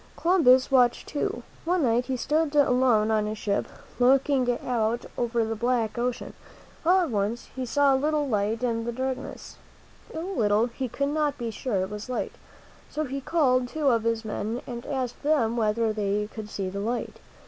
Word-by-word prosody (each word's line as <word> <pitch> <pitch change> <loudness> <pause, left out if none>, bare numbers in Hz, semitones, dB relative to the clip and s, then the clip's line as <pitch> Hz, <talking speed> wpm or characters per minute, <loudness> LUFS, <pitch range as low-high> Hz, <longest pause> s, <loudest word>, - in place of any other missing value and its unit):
Columbus 280 -8 +4
watched 250 -2 +3
too. 245 -4 -3 0.2
One 350 0 +1
night 240 0 +2
he 260 -1 -1
stood 300 +4 0
alone 250 -6 +4
on 215 -1 +1
his 215 0 -4
ship, 200 -1 -1 0.3
looking 260 0 +3 0.2
out 235 -1 0
over 235 -1 0
the 225 0 -3
black 235 -1 0
ocean. 245 0 -2 0.5
All 365 +3 +5
at 330 -7 -1
once 210 +3 -2
he 260 -1 -3
saw 285 +2 +3
a 265 - +1
little 300 -1 +1
light 220 0 0
in 230 -2 0
the 235 - -2
darkness. 260 +1 -5 0.5
It - - -12
was 325 - -3
so 390 - -4
little 210 +1 +3
he 250 +1 -4
could 280 +4 -1
not 295 -1 0
be 235 -2 -3
sure 210 -5 -1
it 190 - -5
was 210 +4 -7
a - - -2
light. - - -2 0.6
So 310 - -2
he 275 -1 -4
called 255 -5 +2
two 295 +2 0
of 230 -3 +3
his 230 0 -1
men 220 +2 -3
and 240 0 -7
asked 260 -4 -3
them 280 -7 +2
whether 220 0 +1
they 210 0 -1
could 215 -2 -7
see 195 -2 -3
the 195 +2 -4
light. 235 +4 -3
245 Hz, 195 wpm, -26 LUFS, 220-275 Hz, 0.6 s, All